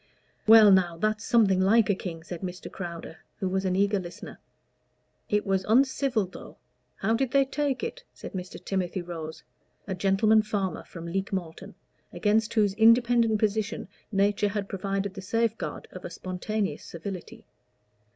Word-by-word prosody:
"Well, 220 -2 +9
now, 180 -3 +3
that's 215 +4 0
something 200 -6 +3
like 215 +4 +4
a 205 - +3
king," 170 -4 -6
said 175 0 -7
Mr. 180 -1 -6
Crowder, 170 -3 -7 0.2
who 195 - -2
was 190 +1 -1
an 185 -1 +1
eager 200 +1 +2
listener. 175 -2 -9 0.9
"It 210 0 +1
was 190 -1 +1
uncivil, 260 -1 +2
though. 180 - -12 0.4
How 220 +3 0
did 255 +2 +1
they 275 +1 +3
take 275 -1 -2
it?" - - -5
said - - -10
Mr. 180 -1 -6
Timothy 185 -2 -2
Rose, 160 -2 -7 0.4
a 195 - -3
"gentleman 195 +4 +3
farmer" 205 -3 -2
from 170 -1 -9
Leek 190 +3 -3
Malton, 175 -4 -5 0.4
against 215 +1 +1
whose 205 -3 +3
independent 230 +1 +4
position 215 0 -1 0.2
nature 205 +1 +2
had 200 -1 -3
provided 195 0 -3
the 195 - -7
safeguard 225 +3 -2
of 185 - -10
a - - -5
spontaneous 190 +4 -3
servility. 180 +2 -8
200 Hz, 155 wpm, -27 LUFS, 185-220 Hz, 0.9 s, Well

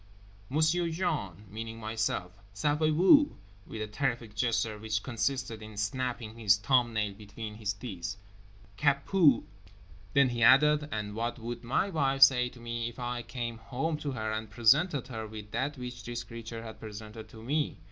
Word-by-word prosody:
"M'sieu 160 +4 +2
Jean" 105 - -2
(meaning 115 +3 -6
myself) 110 -4 -2 0.2
"savez 150 +7 +2
vous"—with 110 - +3
a - - -2
terrific 115 -1 -2
gesture 110 -1 0
which 105 -1 -2
consisted 130 -2 -2
in 110 -1 -10
snapping 115 +1 -2
his 105 -3 +4
thumbnail 110 -2 +2
between 105 +1 -8
his 105 -1 -2
teeth—"ÇA 100 - -3
PUE!" 160 -11 +5 0.7
Then 140 -2 +6
he 120 -1 -3
added: 150 +4 +6
"And 105 -1 -3
what 115 +2 -2
would 120 +1 -6
my 135 +11 0
wife 135 -4 +4
say 125 -2 +6
to 125 - -15
me 115 0 -3
if 120 - -14
I 120 -1 -3
came 120 -1 -5
home 135 +8 -2
to 150 - -4
her 110 -3 -2
and 110 0 -3
presented 130 +6 +3
her 110 -3 -5
with 105 -1 -9
that 145 +5 -2
which 125 -1 -7
this 120 0 -4
creature 115 0 -8
had 110 -1 -9
presented 110 +1 -9
to 110 0 -12
me? 145 +5 0
115 Hz, 160 wpm, -30 LUFS, 110-130 Hz, 0.7 s, Then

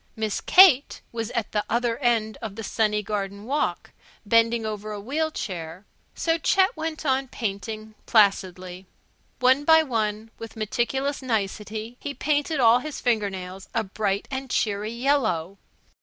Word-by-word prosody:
Miss 220 -2 -2
Kate 345 -7 +6
was 230 -1 -4
at 235 -4 -3
the 210 -1 0
other 235 0 0
end 230 -5 +1
of 215 -3 -6
the 225 - -6
sunny 210 -1 0
garden 200 -1 -4
walk, 290 +4 -2 0.3
bending 230 +1 +3
over 215 0 -5
a 210 - -5
wheel 295 +9 -1
chair. 180 - -6 0.3
So 330 0 0
Chet 385 +7 +3
went 315 -1 -4
on 265 -1 +1
painting, 215 -1 -5
placidly. 185 -4 +1 0.5
One 260 +3 +4
by 320 +1 +6
one, 220 -4 -2
with 225 -1 -9
meticulous 255 +6 -1
nicety, 220 0 -3
he 285 -1 -5
painted 295 +1 0
all 235 0 +6
his 305 +2 -6
finger 220 -5 +1
nails 185 0 -8
a 225 - +2
bright 200 0 -2
and 265 0 -4
cheery 210 -2 0
yellow. 225 - 0
225 Hz, 150 wpm, -25 LUFS, 205-265 Hz, 0.5 s, Kate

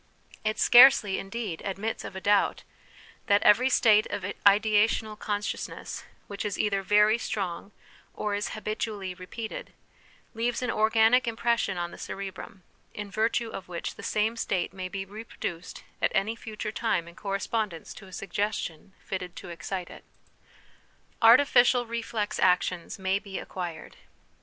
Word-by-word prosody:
It 215 0 -1
scarcely, 245 -5 +7
indeed, 195 -4 -5
admits 200 +3 -3
of - - -8
a 190 - -5
doubt, 205 0 +2 0.6
that 200 0 +4
every 250 +5 +5
state 215 -4 +5
of 205 -1 -4 0.2
ideational 215 +1 +3
consciousness 205 -1 -4 0.2
which 200 -1 -6
is 205 -3 -3
either 200 -2 +1
very 210 +3 +4
strong 195 -2 -4 0.4
or 210 -1 -2
is 205 +1 -2
habitually 215 -3 -3
repeated, 190 +5 -7 0.6
leaves 235 +2 -1
an 250 - 0
organic 225 +3 +4
impression 230 -4 0
on 175 0 -3
the - - -11
cerebrum, 195 -1 -7 0.3
in 205 -1 -6
virtue 225 +2 0
of 190 - -7
which 175 -1 -5
the - - -11
same 215 +2 0
state 185 -5 -1
may 185 -1 -5
be 195 0 -4
reproduced 195 -4 -7 0.2
at - - +2
any 220 +4 +1
future 215 -2 -6
time 215 -7 -1
in 170 - -11
correspond 205 +2 -2
ence 165 -1 -9
to 195 - -12
a - - -14
suggestion 195 -2 -3
fitted 180 -2 -5
to - - -9
excite 175 +1 -5
it." - - -12 1.2
Artificial 245 0 +6
Reflex 225 -2 -3
Actions 180 -1 +1
may 190 0 0
be 195 -2 -7
Acquired. 175 -3 -6
205 Hz, 145 wpm, -27 LUFS, 190-225 Hz, 1.2 s, scarcely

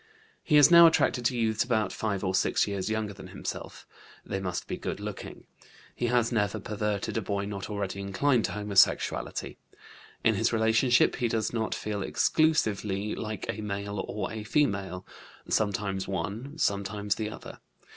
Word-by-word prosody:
He 150 - +3
is 145 +3 +7
now 170 -1 +10
attracted 125 -6 +2
to 125 +1 +1
youths 110 -2 +1
about 110 -6 0
5 100 -3 -2
or 95 -1 0
6 95 - +2
years 100 0 -2
younger 110 -2 -2
than - - -11
himself; - - -7 0.4
they 95 - -3
must 90 -2 -3
be - - -3
good - - -5
looking. - - -7 0.5
He 120 - -1
has 120 -1 +2
never 105 -2 0
perverted 105 +1 -2
a - - 0
boy 100 0 -2
not 100 -1 -5
already 100 -2 -3
inclined 115 +5 +1
to - - -3
homosexuality. 105 -2 +1 0.7
In 110 - +4
his 115 +3 +1
relationship 115 +2 +3
he 120 - +1
does 110 0 -1
not 110 -2 -1
feel 105 -1 -3
exclusively 105 -8 +1
like 110 -1 -5
a 110 - -3
male 100 -1 -3
or 105 - -4
a 110 -1 -5
female: 100 - 0 0.4
sometimes 100 -2 0
one, 110 +9 -4
sometimes 100 -3 0
the 105 0 -3
other. - - -10
105 Hz, 165 wpm, -28 LUFS, 100-115 Hz, 0.7 s, now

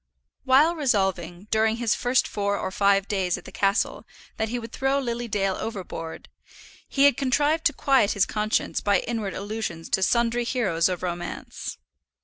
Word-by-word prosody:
While 285 +6 +5
resolving, 190 - 0
during 220 0 +2
his 235 -2 +1
first 250 +1 +1
four 200 0 -1
or - - -3
five 200 0 +2
days 190 -4 0
at 180 - -12
the - - -10
castle, 195 +1 0 0.3
that 220 0 -1
he 245 - -2
would 230 -1 -7
throw 270 +2 0
Lily 240 -2 -3
Dale 195 -3 0
overboard, 180 -7 -6 0.6
he 275 - +2
had 285 0 +6
contrived 290 +4 +1
to - - +4
quiet 265 -7 +3
his 200 -2 +3
conscience 215 0 -1
by 205 -1 +2
inward 220 -4 -3
allusions 200 -5 -5
to 190 - +1
sundry 235 +3 +2
heroes 195 -10 +1
of 180 -1 -4
romance. 175 -1 -5
215 Hz, 165 wpm, -25 LUFS, 190-245 Hz, 0.6 s, had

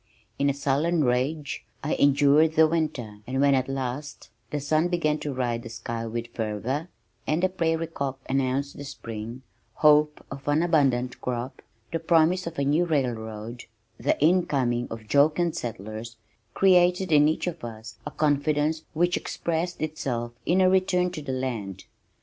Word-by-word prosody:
In 140 0 +3
a - - +1
sullen 150 +4 +1
rage 140 +4 -1 0.2
I 150 - 0
endured 145 +3 +4
the 160 0 +6
winter 150 -10 -2
and 130 +1 -2
when 140 0 +5
at 130 0 +1
last 135 +2 -5 0.2
the 150 - -2
sun 155 +4 +1
began 155 -4 0
to 145 - -3
ride 120 -3 -1
the 115 - -9
sky 115 0 -5
with 115 +1 -5
fervor 115 - -2 0.4
and 155 +4 +1
the 185 - +4
prairie 165 -3 0
cock 140 -5 -4
announced 135 +1 0
the 145 - -6
spring, 115 -2 -7 0.3
hope 150 0 +4
of 135 0 -8
an 145 +3 +3
abundant 135 -7 +1
crop, 125 +1 -4 0.3
the 165 - -1
promise 165 +2 +3
of 170 - -6
a 140 - +1
new 155 +5 +3
railroad, 120 -6 -3 0.3
the - - +1
incoming 140 -7 +2
of 110 -1 -8
jocund 155 +6 +3
settlers 110 +1 -6 0.4
created 180 -1 +4
in 150 -1 +6
each 155 - 0
of 170 -2 -4
us 115 0 -8
a - - -5
confidence 150 +1 +1
which 175 +3 +2
expressed 170 0 -3
itself 125 -6 -3 0.2
in 185 +2 +4
a 185 - +5
return 185 -1 +2
to 175 - -6
the 140 - -4
land. 115 -8 -4
145 Hz, 160 wpm, -26 LUFS, 120-160 Hz, 0.4 s, the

